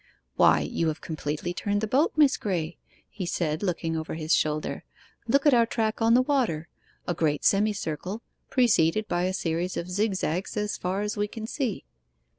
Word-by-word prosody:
'Why, - - +5
you 165 - -1
have 155 0 -2
completely 155 +2 -4
turned 205 +3 -1
the - - +1
boat, 270 +9 +2
Miss 295 -3 +5
Graye?' 175 -5 -3 0.3
he 190 -4 -6
said, 155 -3 -1
looking 165 -4 -1
over 160 0 -4
his 160 0 0
shoulder. 155 0 0 0.4
'Look 280 +5 +3
at 295 - +6
our 235 -1 +5
track 220 -1 -1
on 225 +1 +5
the 255 - +5
water 240 - 0 0.4
a 175 - +1
great 155 -3 0
semicircle, 200 -1 0 0.3
preceded 215 -5 +3
by 175 +1 0
a 185 - 0
series 170 +1 -2
of 175 +2 -4
zigzags 190 -2 -1
as 210 0 -1
far 185 +3 -2
as 210 0 -3
we 205 0 0
can 220 +1 -7
see. 235 -3 -3
190 Hz, 180 wpm, -27 LUFS, 165-220 Hz, 0.4 s, at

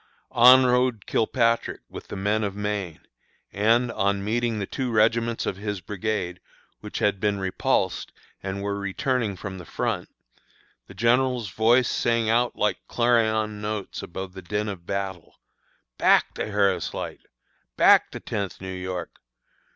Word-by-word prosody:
On 125 +2 +8
rode 125 -4 +2
Kilpatrick 115 +1 +1
with - - -10
the - - -7
men 105 +3 0
of 100 -1 -2
Maine, 105 -5 -3 0.5
and, 115 +4 +3
on 100 -2 0
meeting 115 +1 0
the 100 - -2
two 130 +5 -3
regiments 115 +1 +2
of 95 - -2
his 105 -1 -4
brigade, 95 -2 -3 0.4
which - - -7
had 100 -1 +1
been 105 +1 +1
repulsed 95 -1 0 0.3
and 100 +1 -4
were 100 0 -2
returning 105 +2 -1
from 95 0 -7
the - - -8
front, - - -3 0.8
the - - -13
General's 120 -1 +2
voice 115 +7 +3
sang 115 -2 +1
out 120 +1 +2
like 105 - 0
clarion 110 -3 +1
notes 105 -2 -4
above 95 +1 -7
the 95 - -8
din 105 +4 -2
of 90 -4 -8
battle, 95 -3 -4 0.6
"Back, - - +4
the - - -3
Harris 100 -2 +1
Light! - - -5 0.6
Back, - - +6
the - - -7
Tenth 100 -2 -4
New 95 0 -6
York! 90 -1 -5
105 Hz, 150 wpm, -25 LUFS, 95-115 Hz, 0.8 s, On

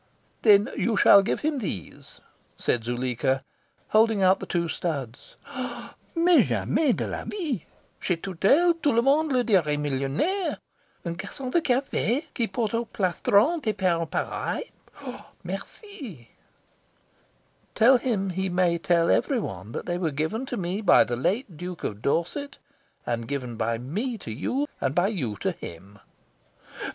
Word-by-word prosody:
"Then 210 -1 +6
you 225 -3 0
shall 200 - +8
give 195 - -1
him 300 -2 0
these," 130 - -6 0.4
said 120 - 0
Zuleika, 130 +2 -1 0.5
holding 215 -2 +4
out 185 +1 +5
the - - -7
two 170 -1 0
studs. 140 -8 -4 0.8
"Mais 340 +1 +5
jamais 305 -5 +1
de - - -2
la - - -4
vie! 305 - -3 0.3
Chez 180 - 0
Tourtel 195 - +3
tout 290 - +3
le 235 - +4
monde 295 +3 +3
le 250 -2 +3
dirait 175 -10 +2
millionaire. 145 - -1 0.5
Un 170 - -2
garcon 210 +8 -6
de 340 - +3
cafe 265 0 0
qui 235 - 0
porte 215 +2 -2
au 230 +1 0
plastron 205 - +2
des 215 -5 0
perles 170 -4 0
pareilles 470 - -3 0.7
merci!" 245 - -8 1.4
"Tell 245 +4 +6
him 200 -7 -1
he 190 +1 -1
may 175 -1 +2
tell 170 0 +3
every 275 - +2
one 95 - -6
that - - -5
they 175 0 -2
were 170 -3 0
given 160 - -2
to 245 - -3
me 185 +3 -2
by 200 - +6
the 120 - -3
late 190 - -1
Duke 180 +1 -7
of 105 0 -4
Dorset, 180 - -1 0.5
and 115 -1 -2
given 130 -4 -4
by 115 0 -1
me 205 - -3
to 115 - -8
you, 255 - -1
and 135 +1 0
by 180 +3 +3
you 135 - -3
to - - +1
him." 95 +5 -10
190 Hz, 150 wpm, -26 LUFS, -, 1.4 s, shall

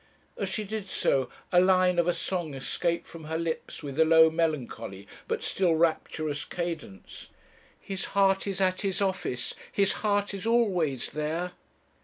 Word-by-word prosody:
As - - -2
she 215 - -1
did 210 -1 -5
so, 130 -7 +1 0.2
a 180 - +6
line 185 -1 +4
of 170 - +2
a 175 - +3
song 175 -6 -3
escaped 170 +5 -1
from 165 -2 -11
her 160 +1 -2
lips 165 -1 -4
with 140 +1 -5
a - - +8
low, 160 0 +6
melancholy, 125 - -2 0.2
but - - -2
still 180 -4 +2
rapturous 155 -2 0
cadence 165 - -6 0.5
'His 195 -1 -5
heart 195 0 +4
is 195 -1 -2
at 185 -1 +2
his 195 -2 -1
office, 190 -11 -1 0.2
his 200 -1 +2
heart 205 -1 +1
is 200 +2 -4
always 180 - +1
there.' 160 +4 -2
170 Hz, 160 wpm, -28 LUFS, 155-190 Hz, 0.5 s, a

